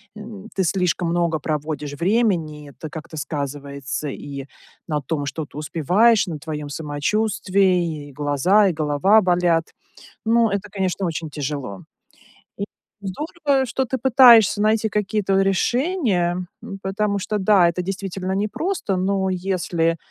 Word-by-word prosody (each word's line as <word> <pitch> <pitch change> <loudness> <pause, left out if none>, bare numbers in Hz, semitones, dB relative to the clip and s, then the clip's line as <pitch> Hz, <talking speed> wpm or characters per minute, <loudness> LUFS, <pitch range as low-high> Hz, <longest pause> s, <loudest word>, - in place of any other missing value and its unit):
м, 210 -1 -9
ты 190 - +1
слишком 180 -1 0
много 170 -2 +1
проводишь 150 -1 -3
времени, 170 -5 0
и - - -11
это 155 - -9
как-то 160 +1 -9
сказывается 140 -1 -4
и 140 0 -7 0.4
на 150 -1 -1
том, 145 +1 -3
что 150 +3 -4
ты 145 - -14
успеваешь, 185 - +3
на 160 -3 -4
твоем 150 -1 -5
самочувствии: 175 0 0
и - - -13
глаза, 145 +9 +3
и 185 - +1
голова 155 +8 +3
болят. 175 -3 +2 0.6
Но 225 -2 +3
это, 200 +1 -2
конечно, 190 -1 -1
очень 160 -1 -3
тяжело. 140 -9 -5 0.8
И 200 - -1 0.4
здорово, 275 - -1
что 265 +2 -1
ты 260 +2 -2
пытаешься 240 -6 +6
найти 220 +1 +2
какие-то 205 -2 0
решения, 195 - +1 0.2
м, 195 -4 -7
потому 200 +1 -1
что, 210 +2 -2
да, 190 -3 +5
это 175 +2 -2
действительно 190 0 -4
непросто. 215 - -1
Но, 190 +1 0
если 175 -3 0
185 Hz, 135 wpm, -22 LUFS, 155-210 Hz, 0.8 s, пытаешься